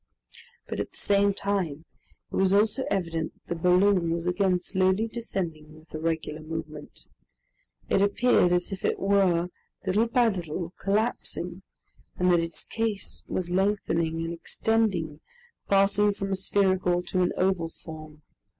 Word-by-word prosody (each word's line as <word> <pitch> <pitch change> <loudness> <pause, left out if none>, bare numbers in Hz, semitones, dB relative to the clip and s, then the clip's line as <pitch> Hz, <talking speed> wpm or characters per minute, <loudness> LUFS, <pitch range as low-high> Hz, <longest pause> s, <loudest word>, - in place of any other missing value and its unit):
But - - -4
at - - -2
the - - -10
same 200 0 +3
time, 185 -6 -2 0.5
it - - -4
was 190 0 +3
also 215 +6 +3
evident 165 -4 -2
that - - -3
the 165 - -8
balloon 180 -1 +4
was 165 0 -1
again 180 0 +2
slowly 190 +4 +1
descending 165 -9 -5
with 160 +1 -20
a 155 - -4
regular 160 -1 -2
movement. 155 -1 -7 0.8
It 195 - +2
appeared 200 -2 +3
as 180 +2 +1
if 195 - -6
it - - +1
were, 190 -3 +2 0.4
little 205 +5 +2
by 235 0 +3
little, 175 -3 -4
collapsing, 195 -4 -1 0.6
and 180 0 +3
that 175 - +5
its 165 -1 -2
case 225 -3 -3
was 175 -1 -3
lengthening 170 -4 0
and 165 - -3
extending, 175 -4 0 0.5
passing 200 +1 +4
from 195 0 -4
a - - +2
spherical 185 -2 +1
to 185 +1 -1
an 180 - +2
oval 185 -3 +1
form. 155 -2 -11
185 Hz, 150 wpm, -27 LUFS, 165-200 Hz, 0.8 s, that